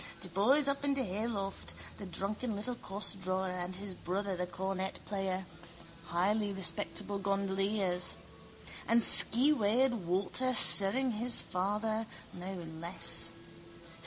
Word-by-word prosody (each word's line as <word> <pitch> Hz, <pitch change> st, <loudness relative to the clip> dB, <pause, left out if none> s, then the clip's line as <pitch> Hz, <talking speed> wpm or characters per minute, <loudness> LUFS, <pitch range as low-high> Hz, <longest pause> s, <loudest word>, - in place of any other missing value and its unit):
De -, -, -1 dB
boys 255 Hz, -, +2 dB
up 280 Hz, 0 st, -2 dB
in 280 Hz, -1 st, 0 dB
de 265 Hz, -, -1 dB
hayloft. 200 Hz, 0 st, -5 dB, 0.2 s
The 200 Hz, -, -8 dB
drunken 210 Hz, +5 st, -4 dB
little 215 Hz, +5 st, -3 dB
costdrawer 190 Hz, -3 st, -3 dB
and 180 Hz, 0 st, -5 dB
his 195 Hz, 0 st, -5 dB
brother, 190 Hz, +2 st, -4 dB
the 180 Hz, 0 st, -4 dB
cornet 190 Hz, +1 st, -5 dB
player. 190 Hz, -2 st, -4 dB, 0.6 s
Highly 200 Hz, +5 st, -1 dB
respectable 200 Hz, +1 st, -3 dB
gondoliers! 195 Hz, -1 st, -1 dB, 0.7 s
And 230 Hz, -, +3 dB
skeweyed 245 Hz, +1 st, +6 dB
Walter 200 Hz, +6 st, -1 dB
sirring 240 Hz, +5 st, +7 dB
his 235 Hz, +3 st, 0 dB
father, 215 Hz, +4 st, -3 dB, 0.3 s
no 180 Hz, 0 st, -8 dB, 0.2 s
less! 170 Hz, +2 st, 0 dB
200 Hz, 115 wpm, -31 LUFS, 185-220 Hz, 0.7 s, sirring